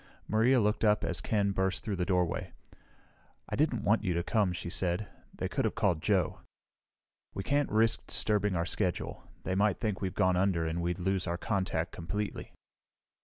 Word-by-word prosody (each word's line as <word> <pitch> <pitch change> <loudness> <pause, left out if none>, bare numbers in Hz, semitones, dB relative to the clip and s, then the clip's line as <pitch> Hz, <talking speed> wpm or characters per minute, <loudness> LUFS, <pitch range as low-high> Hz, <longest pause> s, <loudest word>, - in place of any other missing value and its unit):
Maria 120 +4 +4
looked 105 0 +1
up 105 -1 +4
as - - -2
Ken 100 -2 +1
burst 95 -1 -1
through 105 -3 -2
the 90 -1 -2
doorway. 90 -3 0 1.0
"I - - -3
didn't 145 -5 +1
want 110 +2 +3
you 90 -4 0
to 85 - 0
come," 105 -3 +2
she 85 - -5
said. 90 +3 -1 0.2
"They - - -3
could - - -1
have - - 0
called 100 -8 +1
Joe." 95 -3 +1 1.0
"We 95 - -3
can't 145 +5 +1
risk 110 +1 +2
disturbing 105 -2 +1
our 85 0 0
schedule. 90 -1 -2 0.2
They 95 - -2
might 100 0 +2
think 105 -4 -2
we've 95 -1 -2
gone 95 -3 +3
under 90 -3 +2
and 80 +2 -2
we'd 85 +1 -1
lose 95 +1 0
our 85 +1 -1
contact 95 -4 -1
completely." 100 +5 -4
95 Hz, 180 wpm, -31 LUFS, 90-105 Hz, 1.0 s, Maria